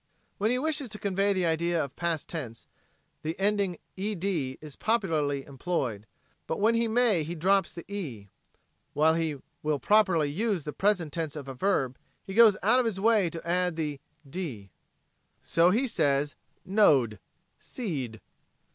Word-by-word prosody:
When 210 +2 +2
he 250 - +2
wishes 295 -2 -1
to 210 - -5
convey 200 0 +1
the 185 -2 +1
idea 170 0 +1
of 135 - -13
past 170 -3 -2
tense, 125 -9 -6 0.6
the 160 +3 -4
ending 200 -3 +1 0.2
"ed" 195 -1 -3
is 150 -5 -3
popularly 155 -11 0
employed, 130 - -3 0.4
but 160 - -2
when 220 +3 +4
he 230 0 +2
may 225 -6 +3
he 165 +3 -4
drops 190 +3 +2
the 170 - -9
"e." 145 - -6 0.7
While 155 +2 +4
he 160 -2 0 0.3
will 150 -1 0
properly 185 -4 +3
use 190 +3 -1
the 150 - -5
present 185 -7 +1
tense 160 -3 -3
of 145 -3 -7
a 135 - -5
verb 135 -4 0 0.2
he 195 - -7
goes 220 -2 +7
out 235 +6 +5
of 250 - +2
his 215 -4 -1
way 210 -4 +3
to 165 0 -8
add 180 0 +1
the 150 -3 -3 0.3
"(e)d." 135 - -6 0.7
So 170 +1 +4
he 230 +8 +2
says 145 - +1 0.3
"know 185 - +5
d," 105 -3 -11 0.4
"see 165 - -4
d." 110 -1 -13
170 Hz, 165 wpm, -28 LUFS, 145-205 Hz, 0.7 s, goes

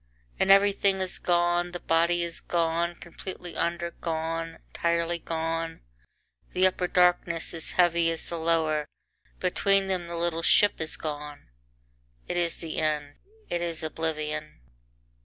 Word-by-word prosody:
VIII - - -37
And - - +2
everything 195 0 +5
is 185 -1 -2
gone, 175 0 +1
the 175 - -4
body 170 +1 +2
is 170 -1 -5
gone 170 0 0
completely 175 0 -8
under, 170 0 -1
gone, 165 0 -3
entirely 170 0 0
gone. 165 0 -3 0.7
The 185 +1 +4
upper 185 -1 +2
darkness 175 -2 +2
is 165 -2 -3
heavy 170 -2 +4
as 165 -1 -3
the 170 - -4
lower, 160 -2 +1 0.5
between 195 +2 +2
them 180 -2 -1
the 170 0 -5
little 165 -1 0
ship 205 +2 +4
is 155 - -1
gone 150 - -6 0.8
It - - -2
is 175 -1 0
the 165 -2 -4
end, 150 -2 -1 0.3
it 175 - -1
is 170 -2 -3
oblivion. 155 - -3
170 Hz, 140 wpm, -27 LUFS, 160-175 Hz, 0.8 s, everything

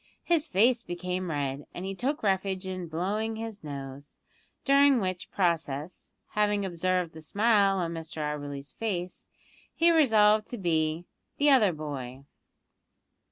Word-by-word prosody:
His 335 -2 +1
face 230 +5 +3
became 180 -1 -4
red, 140 -2 -3
and 180 - -5
he 195 - -3
took 265 +8 -2
refuge 190 -1 0
in 185 -2 -4
blowing 205 +7 -2
his 220 -3 -7
nose, 140 -1 -8 0.5
during 275 -1 +5
which 185 -3 -3
process 165 -3 -2
having 210 -1 +1
observed 180 -1 -1
the 160 - -10
smile 200 +3 +3
on 170 -2 -2
Mr 165 0 -7
Auberly's 145 -2 -4
face 180 -5 -4 0.5
he 340 0 +4
resolved 215 -9 +4
to 245 - -6
be 160 -3 0 0.3
"the 290 0 +4
other 220 -8 +5
boy." 140 -4 -6
185 Hz, 135 wpm, -28 LUFS, 160-215 Hz, 0.5 s, during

